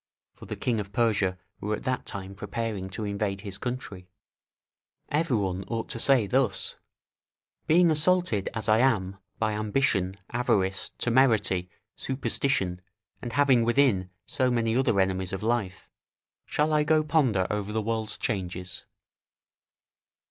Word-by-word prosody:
for - - -13
the - - -4
kings 120 -3 -1
of 100 -1 -5
Persia 105 -6 +1 0.2
were 105 +1 -1
at - - -9
that 130 -1 -2
time 95 -1 -6
preparing 105 -1 -4
to 105 +3 -5
invade 100 -1 -2
his 100 -1 -7
country. 100 -7 -5 1.0
Every 150 -5 +1
one 95 -2 -2
ought 115 -1 -3
to 115 - -3
say 130 -3 +4
thus, 115 -1 +1 0.9
"Being 170 +1 +5
assaulted, 155 - +2
as 110 -3 -3
I 110 +1 +5
am 100 -7 +2 0.2
by 110 -1 0
ambition, 105 -3 0
avarice, 95 -6 +1
temerity, 110 -8 +2 0.3
superstition, 130 -8 -1 0.4
and 120 -2 -5
having 130 -3 +4
within 115 -6 +2 0.2
so 130 -1 +1
many 115 -2 +1
other 125 -6 +2
enemies 95 -1 0
of 95 - -4
life, 110 -5 -1 0.6
shall 155 +1 +1
I 150 0 +4
go 155 +1 +3
ponder 130 - +2
over 105 0 -2
the 110 - 0
world's 110 0 0
changes?" 90 -4 -3
110 Hz, 140 wpm, -27 LUFS, 95-130 Hz, 1.0 s, Being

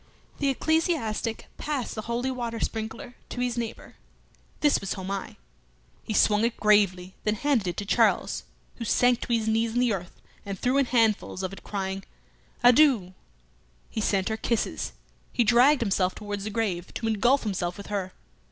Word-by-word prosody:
The 280 - +2
ecclesiastic 270 -7 0
passed 285 -5 -2
the 215 - -4
holy 235 +4 -2
water 235 -3 -4
sprinkler 225 +3 -4
to - - -6
his 245 -1 0
neighbour. 235 -2 -6 0.6
This 295 -1 +3
was 195 - -2
Homais. 195 0 -5 0.7
He 215 - -4
swung 210 +1 +4
it 235 0 0
gravely, 195 -4 +3
then 210 0 +1
handed 255 -5 +1
it 175 - -3
to 205 - -3
Charles, - - +2 0.3
who 235 - -5
sank 245 +2 +3
to - - -4
his 225 -2 +1
knees 225 +1 +1
in - - +3
the 245 -3 +3
earth 180 -2 -6 0.2
and 200 -1 -5
threw 255 +7 +2
in 275 - +2
handfuls 220 -5 +1
of 185 +1 -3
it, - - -10
crying, 195 -1 -3 0.6
"Adieu!" 245 -7 +5 0.8
He 220 - -2
sent 195 -1 +1
her 220 - -1
kisses; 230 0 -1 0.4
he 240 - +2
dragged 245 +5 +5
himself 190 -4 +1
towards 205 -1 -5
the - - -2
grave, 200 -6 -2
to 230 - -3
engulf 240 +6 +3
himself 180 -4 -2
with 200 - -8
her. 190 -2 -2
220 Hz, 170 wpm, -27 LUFS, 200-245 Hz, 0.8 s, Adieu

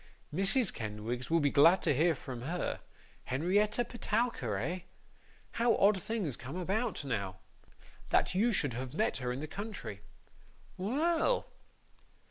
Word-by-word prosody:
Mrs. 195 - +3
Kenwigs 110 +3 -4
will 165 0 +4
be 145 -1 +2
glad 165 +6 +6
to - - +3
hear 160 +4 +3
from 125 -2 -7
her. 170 +7 -2 0.5
Henrietta 205 - +1
Petowker, 220 - -1
eh? 165 - -2 0.7
How 235 0 +2
odd 200 -1 +4
things 210 - -2
come 135 +5 -8
about, 195 0 -1
now! 100 -8 -2 0.7
That - - +3
you 220 +6 +3
should 145 - +1
have 130 +3 -5
met 220 +5 +1
her 125 -2 -2
in 130 +3 -4
the 155 - -4
country! 200 - -6 0.7
Well! 320 - +1
175 Hz, 135 wpm, -32 LUFS, 130-215 Hz, 0.7 s, glad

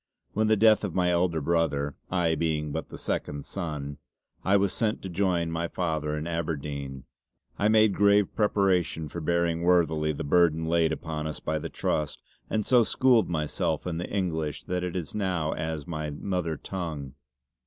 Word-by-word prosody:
When 110 +1 +2
on - - +1
the 110 0 +4
death 110 0 +5
of 100 -5 -3
my 90 -1 +3
elder 85 -2 +2
brother, 75 -3 0
I 90 -3 +2
being 75 -2 -1
but 80 +2 -4
the - - -8
second 70 -1 -3
son, 75 -6 -4 0.4
I 100 +1 +4
was 100 -1 +1
sent 110 -2 -1
to 95 - -4
join 90 -2 0
my 85 +1 -1
father 80 -4 -2
in 75 - -3
Aberdeyne, 75 -5 -4 0.6
I 100 - +3
made 110 -1 +5
grave 100 0 +3
preparation 95 -7 +1
for 85 - -5
bearing 85 +1 +1
worthily 80 -3 +3
the 75 - -4
burden 80 +1 +3
laid 80 -1 +2
upon 80 -1 -3
us 75 - -5
by 80 0 -2
the - - -5
Trust 75 -1 -2 0.3
and 110 -2 0
so 125 -2 +5
schooled 120 -2 +3
myself 80 -1 -1
in 85 -2 -2
the 90 - -4
English 80 -7 -2
that 90 0 -2
it 90 -1 -3
is 85 -6 -4
now 90 -6 -1
as 80 -2 -3
my 75 -3 -4
mother 85 +1 -2
tongue. 80 -8 -5
85 Hz, 180 wpm, -27 LUFS, 75-95 Hz, 0.6 s, death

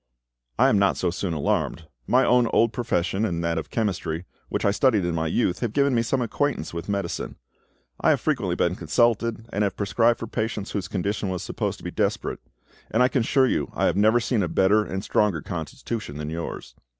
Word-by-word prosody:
I - - +5
am 105 - +3
not 100 -1 +3
so 90 - 0
soon 90 0 -3
alarmed. 75 +2 -1 0.2
My - - +4
own 125 -1 +4
old 115 0 +2
profession, 105 -4 0
and 85 -6 -1
that 85 -1 0
of - - -7
chemistry, 90 -6 -2 0.2
which - - -2
I 100 - +4
studied 105 -3 +2
in 85 - -1
my 80 0 -1
youth, 90 +1 0
have 115 -3 -2
given 140 -1 +3
me 115 - +3
some 125 +2 0
acquaintance 120 - -1
with 85 +3 -5
medicine. 100 -1 -3 0.6
I - - +3
have - - +4
frequently - - 0
been - - +1
consulted, 115 -1 +1
and 105 - +1
have 100 - -1
prescribed 115 +4 +2
for - - -5
patients 110 -2 -3
whose 100 -3 -3
condition 100 +1 -2
was 90 -1 -3
supposed - - -3
to - - -16
be - - -4
desperate, - - -1 0.5
and 120 +3 +3
I 125 - +4
can 130 - +1
assure 130 +3 +3
you 130 - 0
I - - +1
have - - +2
never 110 +4 +4
seen 115 -1 0
a 90 - 0
better 100 +5 +3
and 95 -1 -4
stronger 105 -7 +1
constitution 90 - -5
than 75 0 -4
yours. 85 +1 -6
105 Hz, 210 wpm, -25 LUFS, 90-115 Hz, 0.6 s, I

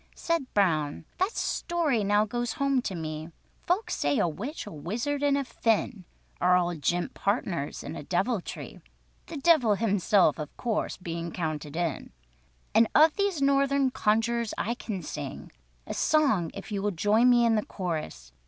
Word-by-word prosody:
Said 335 -6 -1
Brown, 155 -7 +1
"That 380 +5 +1
story 315 - 0
now 205 +1 +3
goes 240 +1 -2
home 275 -2 +1
to 195 - -4
me. 155 -1 -5 0.4
Folks 370 +6 0
say 145 0 +1
a - - +2
witch, 230 - -5
a 205 - -8
wizard, 230 - -3
and 285 -1 +3
a 280 - 0
Finn, 220 -6 -1 0.4
Are 180 0 +5
all 175 -1 0
jint 175 +3 -1
partners 190 - -2
in - - -6
all - - -6
deviltry, 190 - -3 0.5
The 330 - -6
Devil 275 -8 +4
himself 200 -6 +2
of 150 -1 -7
course 230 -3 -2
bein' 170 -1 -5
counted 155 -3 -4
in; 170 -4 -2 0.6
And 225 0 +5
of 310 +1 +6
these 400 -8 0
Northern 275 -1 +3
conjurers 225 +1 0
I 235 - -1
can 205 -6 -5
sing 145 -2 -6 0.3
A - - -5
song 275 - +2
if - - -8
you 200 -1 -2
will 205 - +1
join 210 +6 +3
me 240 -1 +5
in 230 - +4
the 215 -1 +1
chorus. 155 - -5
210 Hz, 165 wpm, -28 LUFS, 170-265 Hz, 0.6 s, of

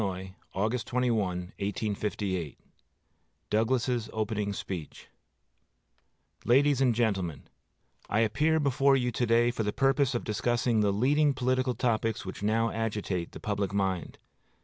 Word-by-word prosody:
AUGUST 110 +5 -1
21, 125 -1 +1 0.4
1858 100 -4 -2 0.9
Douglas's 120 +1 +1
Opening 105 -1 -2
Speech 90 -5 -6 1.3
LADIES 135 +2 +4
AND 125 -4 +3
GENTLEMEN: 95 - -1 0.7
I 110 - +2
appear 150 +9 +2
before 140 -1 +3
you 125 -2 +1
to 120 +1 -1
day 120 +1 +4
for 120 - -3
the 105 -1 0
purpose 135 +1 +2
of 120 - -1
discussing 120 +2 0
the 105 -1 +3
leading 140 +7 +2
political 130 0 0
topics 115 -2 0
which 95 - -7
now 110 +2 +1
agitate 105 -6 -2
the - - -8
public 100 -2 -2
mind. 95 -3 -1
115 Hz, 125 wpm, -29 LUFS, 105-125 Hz, 1.3 s, LADIES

